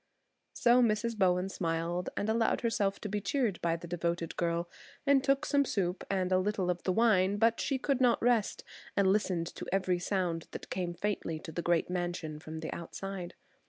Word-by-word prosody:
So 245 Hz, +1 st, +5 dB
Mrs. 230 Hz, 0 st, +1 dB
Bowen 185 Hz, -2 st, +2 dB
smiled 170 Hz, -1 st, -2 dB
and 205 Hz, -, -1 dB
allowed 225 Hz, +1 st, +2 dB
herself 200 Hz, -4 st, 0 dB
to -, -, -3 dB
be 205 Hz, 0 st, -2 dB
cheered 235 Hz, -6 st, 0 dB
by 165 Hz, -1 st, +1 dB
the 170 Hz, -, -8 dB
devoted 170 Hz, -1 st, -2 dB
girl, 170 Hz, 0 st, 0 dB, 0.4 s
and 275 Hz, -2 st, +4 dB
took 275 Hz, +2 st, +2 dB
some 285 Hz, -1 st, +3 dB
soup 190 Hz, -7 st, -1 dB
and 185 Hz, -2 st, 0 dB
a 185 Hz, -, +4 dB
little 190 Hz, -2 st, 0 dB
of 175 Hz, -, -4 dB
the 185 Hz, -, 0 dB
wine; 200 Hz, -2 st, +3 dB
but 230 Hz, +2 st, +3 dB
she 275 Hz, -, 0 dB
could 270 Hz, 0 st, 0 dB
not 245 Hz, -2 st, +4 dB
rest, 235 Hz, -3 st, +1 dB, 0.3 s
and 200 Hz, -1 st, +4 dB
listened 185 Hz, -5 st, 0 dB
to -, -, -7 dB
every 185 Hz, -2 st, +1 dB
sound 175 Hz, -3 st, -1 dB
that -, -, -8 dB
came 175 Hz, -2 st, -2 dB
faintly 200 Hz, -5 st, -2 dB
to 160 Hz, -, -8 dB
the 170 Hz, -, -3 dB
great 170 Hz, -1 st, +2 dB
mansion 175 Hz, -4 st, -3 dB
from 160 Hz, +1 st, -7 dB
the 160 Hz, -, -4 dB
outside. 180 Hz, +1 st, -6 dB
190 Hz, 195 wpm, -31 LUFS, 175-220 Hz, 0.4 s, So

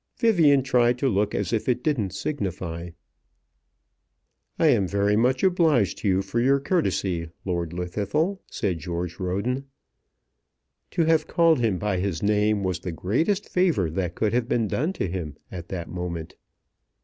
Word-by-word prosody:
Vivian 165 Hz, -, +4 dB
tried 125 Hz, -2 st, +3 dB
to 135 Hz, -, 0 dB
look 105 Hz, -3 st, +1 dB
as -, -, -2 dB
if 115 Hz, +2 st, 0 dB
it 125 Hz, 0 st, 0 dB
didn't 130 Hz, -11 st, 0 dB
signify. 95 Hz, -, -4 dB, 1.7 s
"I -, -, +2 dB
am 105 Hz, -9 st, +3 dB
very 100 Hz, +2 st, +1 dB
much 125 Hz, +4 st, +2 dB
obliged 160 Hz, -, +3 dB
to -, -, -2 dB
you 95 Hz, 0 st, +3 dB
for 100 Hz, +4 st, -2 dB
your 135 Hz, +3 st, +3 dB
courtesy, 95 Hz, -, -1 dB, 0.2 s
Lord 85 Hz, -3 st, -1 dB
Llwddythlw," 100 Hz, -, -1 dB
said 95 Hz, -6 st, -2 dB
George 85 Hz, +1 st, -4 dB
Roden. 100 Hz, +9 st, -2 dB, 1.2 s
To 165 Hz, -, +1 dB
have 160 Hz, -1 st, +2 dB
called 165 Hz, -4 st, +3 dB
him 110 Hz, -6 st, +1 dB
by 100 Hz, -1 st, -1 dB
his 95 Hz, -3 st, -2 dB
name 105 Hz, 0 st, +2 dB
was 90 Hz, -2 st, -1 dB
the 90 Hz, 0 st, -5 dB
greatest 160 Hz, -, 0 dB
favour 165 Hz, -, +1 dB
that 90 Hz, 0 st, -2 dB
could 110 Hz, -1 st, 0 dB
have 120 Hz, 0 st, 0 dB
been 115 Hz, -2 st, +1 dB
done 150 Hz, -, 0 dB
to 100 Hz, -, -2 dB
him 85 Hz, -5 st, -5 dB
at 85 Hz, -2 st, -7 dB
that 85 Hz, -3 st, -4 dB
moment. 85 Hz, -2 st, -5 dB
105 Hz, 160 wpm, -25 LUFS, 90-135 Hz, 1.7 s, Vivian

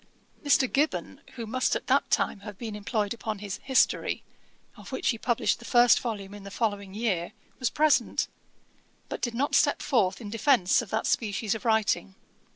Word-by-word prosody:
Mr. 285 Hz, -2 st, +4 dB
Gibbon, 290 Hz, +4 st, -1 dB
who 235 Hz, -2 st, -5 dB
must 255 Hz, +4 st, 0 dB
at -, -, -4 dB
that -, -, +2 dB
time -, -, +1 dB
have 205 Hz, -1 st, -9 dB
been 220 Hz, -1 st, -6 dB
employed 210 Hz, 0 st, -1 dB
upon 220 Hz, -2 st, -4 dB
his 200 Hz, -1 st, -5 dB
History, 265 Hz, -1 st, +1 dB, 0.5 s
of -, -, -12 dB
which -, -, -1 dB
he 230 Hz, -, 0 dB
published 240 Hz, -1 st, +1 dB
the -, -, -13 dB
first 240 Hz, 0 st, +5 dB
volume 205 Hz, -5 st, -5 dB
in 205 Hz, -, -9 dB
the 200 Hz, -, -9 dB
following 200 Hz, -2 st, -2 dB
year, 200 Hz, -7 st, -1 dB, 0.3 s
was 255 Hz, -, +1 dB
present; 310 Hz, 0 st, +2 dB, 0.8 s
but -, -, -5 dB
did 240 Hz, -2 st, -2 dB
not 280 Hz, +4 st, 0 dB
step -, -, +4 dB
forth 190 Hz, -8 st, +1 dB
in 210 Hz, -3 st, -8 dB
defence 230 Hz, -5 st, +3 dB
of 230 Hz, -, -9 dB
that 220 Hz, +3 st, -1 dB
species 215 Hz, -1 st, 0 dB
of 220 Hz, -, -7 dB
writing. 220 Hz, -, +1 dB
220 Hz, 180 wpm, -27 LUFS, 200-240 Hz, 0.8 s, first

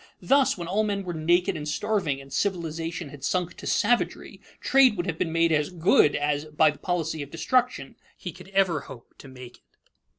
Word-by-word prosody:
Thus, 275 Hz, -4 st, +3 dB
when 170 Hz, -2 st, -6 dB
all 195 Hz, +5 st, +1 dB
men 200 Hz, -2 st, -2 dB
were 180 Hz, -2 st, -5 dB
naked 170 Hz, +3 st, +1 dB
and 150 Hz, -1 st, -5 dB
starving, 190 Hz, -6 st, -1 dB
and 135 Hz, 0 st, -12 dB
civilization 165 Hz, -3 st, -3 dB
had 140 Hz, -1 st, -12 dB
sunk 180 Hz, -1 st, -1 dB
to -, -, -8 dB
savagery, 235 Hz, +3 st, 0 dB, 0.2 s
trade 265 Hz, -5 st, +4 dB
would 175 Hz, -, -2 dB
have 170 Hz, -3 st, -4 dB
been 175 Hz, -3 st, -1 dB
made 165 Hz, 0 st, +2 dB
as 150 Hz, -2 st, +1 dB
"good" 170 Hz, -4 st, +3 dB
as, 145 Hz, 0 st, -1 dB
by 155 Hz, 0 st, +3 dB
the 145 Hz, -, -15 dB
policy 160 Hz, -3 st, -2 dB
of 140 Hz, -, -7 dB
destruction, 245 Hz, -, -1 dB, 0.2 s
he -, -, -6 dB
could -, -, -14 dB
ever 190 Hz, -5 st, +1 dB
hope 120 Hz, -3 st, -13 dB
to -, -, -12 dB
make 125 Hz, -2 st, -12 dB
it. -, -, -37 dB
165 Hz, 200 wpm, -25 LUFS, 150-195 Hz, 0.2 s, trade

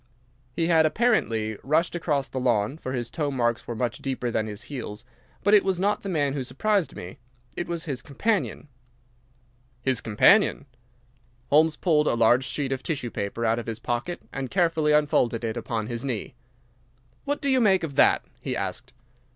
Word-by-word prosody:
He 165 Hz, -, +1 dB
had 160 Hz, -2 st, +4 dB
apparently 115 Hz, -, +1 dB
rushed 155 Hz, +5 st, +1 dB
across 150 Hz, -5 st, -1 dB
the 130 Hz, -, -4 dB
lawn, 120 Hz, +2 st, +1 dB
for 130 Hz, -, -5 dB
his 120 Hz, -2 st, -3 dB
toe 150 Hz, -3 st, -1 dB
marks 120 Hz, -3 st, -1 dB
were 120 Hz, -, -4 dB
much 120 Hz, 0 st, -2 dB
deeper 130 Hz, -3 st, -3 dB
than 110 Hz, -1 st, -1 dB
his 105 Hz, -1 st, -7 dB
heels. 120 Hz, -5 st, -7 dB, 0.4 s
But 205 Hz, -, +3 dB
it 210 Hz, -, +7 dB
was 190 Hz, -2 st, 0 dB
not 205 Hz, +2 st, +1 dB
the 200 Hz, -, -5 dB
man 145 Hz, -6 st, 0 dB
who 140 Hz, -2 st, -2 dB
surprised 200 Hz, +7 st, 0 dB
me. 90 Hz, +9 st, -9 dB, 0.4 s
It 175 Hz, -, -3 dB
was 170 Hz, -1 st, -3 dB
his 135 Hz, -7 st, -4 dB
companion." 185 Hz, -, -1 dB, 1.2 s
"His 130 Hz, -3 st, 0 dB
companion!" 140 Hz, -, +4 dB, 0.9 s
Holmes 155 Hz, +2 st, +5 dB
pulled 150 Hz, -3 st, +2 dB
a -, -, +2 dB
large 120 Hz, +3 st, +4 dB
sheet 140 Hz, -1 st, -2 dB
of 135 Hz, -1 st, -2 dB
tissue 140 Hz, -7 st, -3 dB
paper 105 Hz, +2 st, -3 dB
out 115 Hz, +1 st, +2 dB
of 120 Hz, -, -7 dB
his 115 Hz, -2 st, -3 dB
pocket 120 Hz, +7 st, -3 dB
and 135 Hz, -1 st, -4 dB
carefully 165 Hz, -4 st, +2 dB
unfolded 145 Hz, -6 st, +2 dB
it 115 Hz, 0 st, -2 dB
upon 115 Hz, -2 st, -3 dB
his 115 Hz, +2 st, -4 dB
knee. 125 Hz, -5 st, -3 dB, 0.9 s
"What 285 Hz, +1 st, -2 dB
do 280 Hz, -, -2 dB
you 260 Hz, -1 st, +4 dB
make 190 Hz, -5 st, +4 dB
of 155 Hz, -4 st, -3 dB
that?" -, -, +4 dB, 0.2 s
he -, -, -3 dB
asked. -, -, -5 dB
135 Hz, 185 wpm, -25 LUFS, 120-165 Hz, 1.2 s, it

